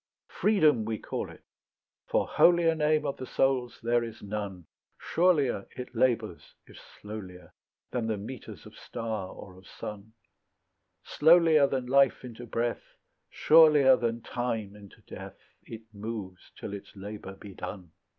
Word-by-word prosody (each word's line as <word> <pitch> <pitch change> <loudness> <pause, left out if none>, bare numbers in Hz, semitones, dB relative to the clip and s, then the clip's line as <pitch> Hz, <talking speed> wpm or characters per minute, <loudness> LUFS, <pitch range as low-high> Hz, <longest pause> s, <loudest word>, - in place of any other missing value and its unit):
Freedom 155 - +3
we 110 0 -3
call - - -5
it, - - -15 0.6
for - - +1
holier 170 -1 +4
Name 155 -1 +1
of 140 - -2
the 130 - -7
soul's 130 -3 0
there 120 0 +2
is 115 -1 -8
none; 100 -4 -5 0.3
Surelier 150 - +1
it 125 -1 -7
labours 115 -6 -1
if - - -16
slowlier, 95 -5 -10 0.4
Than 120 -3 -2
the 110 -2 -1
metres 110 +4 -9
of - - -13
star 110 -5 -5
or 95 - -11
of 95 0 -17
sun; 105 +1 -9 0.9
Slowlier 160 -2 +5
than 130 -2 -2
life 135 +1 +3
into 120 -1 -9
breath, 115 +1 -3 0.3
Surelier 150 -4 +6
than 115 -1 -2
time 115 -5 -3
into 100 -1 -15
death, - - -10 0.3
It 115 -1 -9
moves 100 -3 -7
till - - -6
its 100 +1 -9
labour 100 0 -8
be 100 0 -11
done. 90 -3 -8
115 Hz, 140 wpm, -28 LUFS, 105-135 Hz, 0.9 s, Surelier